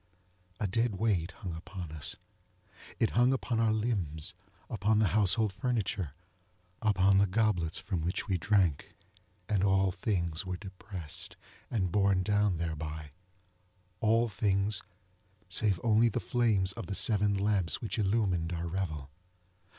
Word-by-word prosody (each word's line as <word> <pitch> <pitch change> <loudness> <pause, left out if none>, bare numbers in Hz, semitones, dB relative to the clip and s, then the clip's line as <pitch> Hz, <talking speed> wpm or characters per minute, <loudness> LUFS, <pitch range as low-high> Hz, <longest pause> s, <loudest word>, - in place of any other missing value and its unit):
A - - 0
dead 115 +2 +1
weight 95 -5 +1
hung 90 -2 -7
upon 85 0 -7
us. 75 -3 -2 0.8
It 115 - +2
hung 120 +2 +4
upon 125 -3 -1
our 115 -1 +3
limbsŌĆöupon 105 0 -2
the 105 -3 +3
household 105 0 +3
furnitureŌĆöupon 95 - -1
the 100 - +4
goblets 90 -6 +1
from 95 -3 -3
which 90 +6 -2
we 95 -3 0
drank; 90 -4 +1 0.5
and 100 -3 +1
all 95 -1 +3
things 90 -4 -1
were 90 -1 -4
depressed, 95 -4 -6 0.3
and 95 -7 0
borne 100 -1 +3
down 105 -2 +2 1.4
therebyŌĆöall 115 +1 +3
things 100 +1 +1 0.7
save 95 0 +1
only 115 +1 +4
the - - -1
flames 110 -6 +2
of 115 +3 -6
the 100 - -3
seven 105 -1 +3
lamps 100 -4 +1
which 110 0 -3
illumined 95 -5 +1
our 85 0 -3
revel. 80 -6 -3
100 Hz, 125 wpm, -31 LUFS, 90-110 Hz, 1.4 s, hung